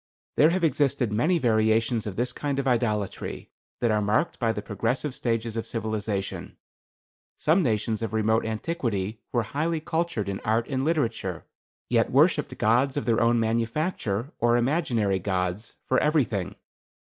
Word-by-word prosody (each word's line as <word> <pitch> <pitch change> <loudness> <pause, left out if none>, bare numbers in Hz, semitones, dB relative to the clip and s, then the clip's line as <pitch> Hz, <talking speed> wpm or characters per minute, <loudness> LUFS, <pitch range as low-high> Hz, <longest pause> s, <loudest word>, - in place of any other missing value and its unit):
There 155 - +6
have 180 +1 0
existed 140 -6 +1
many 155 +12 +2
variations 110 -3 +2
of 100 - -5
this 120 +3 -1
kind 140 0 -2
of 140 -1 -1
idolatry 110 -5 -1 0.3
that 120 -2 +2
are 105 0 +2
marked 105 +11 0
by 115 -2 +2
the 105 -2 -5
progressive 120 +7 -2
stages 115 -4 -2
of 115 - -3
civilization. 110 -3 -3 0.8
Some 165 +5 +3
nations 110 - 0
of 115 -2 -2
remote 110 +1 +2
antiquity 110 - -2
were 120 -2 +1
highly 155 +8 -1
cultured 160 -9 -2
in 100 -1 -3
art 115 +2 0
and 130 -1 -1
literature, 115 - -1 0.4
yet - - +2
worshipped - - +3
gods 125 +5 +2
of - - -1
their 115 -1 +2
own 115 0 +3
manufacture, 115 - -1
or 120 +1 +3
imaginary 120 - +1
gods, 90 +2 -2
for 130 - +2
everything. 125 - 0
115 Hz, 150 wpm, -26 LUFS, 110-140 Hz, 0.8 s, There